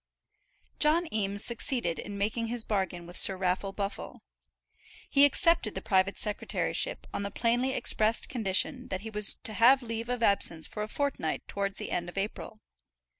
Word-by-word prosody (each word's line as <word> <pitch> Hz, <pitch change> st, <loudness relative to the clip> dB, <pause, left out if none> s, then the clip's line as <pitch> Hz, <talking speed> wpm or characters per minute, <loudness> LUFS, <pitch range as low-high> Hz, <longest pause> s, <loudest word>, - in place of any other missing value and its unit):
John 330 Hz, +3 st, +4 dB
Eames 200 Hz, -1 st, +1 dB
succeeded 235 Hz, -6 st, +1 dB
in 205 Hz, 0 st, -7 dB
making 220 Hz, +3 st, -2 dB
his 235 Hz, 0 st, -3 dB
bargain 190 Hz, -4 st, -2 dB
with 175 Hz, +1 st, -7 dB
Sir 190 Hz, -, +6 dB
Raffle 185 Hz, +1 st, -1 dB
Buffle. 200 Hz, +1 st, -6 dB, 0.8 s
He 280 Hz, 0 st, +5 dB
accepted 310 Hz, -, +2 dB
the 190 Hz, -, -4 dB
private 190 Hz, 0 st, +1 dB
secretaryship 215 Hz, -, 0 dB
on -, -, -3 dB
the 200 Hz, -, -3 dB
plainly 240 Hz, +5 st, 0 dB
expressed 220 Hz, +1 st, +1 dB
condition 240 Hz, +3 st, 0 dB
that 185 Hz, 0 st, -4 dB
he 220 Hz, +1 st, -7 dB
was 210 Hz, -1 st, +1 dB
to 215 Hz, -, -1 dB
have 255 Hz, +5 st, +5 dB
leave 230 Hz, 0 st, -5 dB
of 245 Hz, -1 st, -2 dB
absence 175 Hz, -6 st, +1 dB
for 210 Hz, -, -7 dB
a 210 Hz, -, -3 dB
fortnight 275 Hz, -, -3 dB
towards 200 Hz, 0 st, -3 dB
the -, -, -6 dB
end 175 Hz, 0 st, -2 dB
of 175 Hz, -, -13 dB
April. 210 Hz, +2 st, -5 dB
210 Hz, 170 wpm, -29 LUFS, 195-240 Hz, 0.8 s, Sir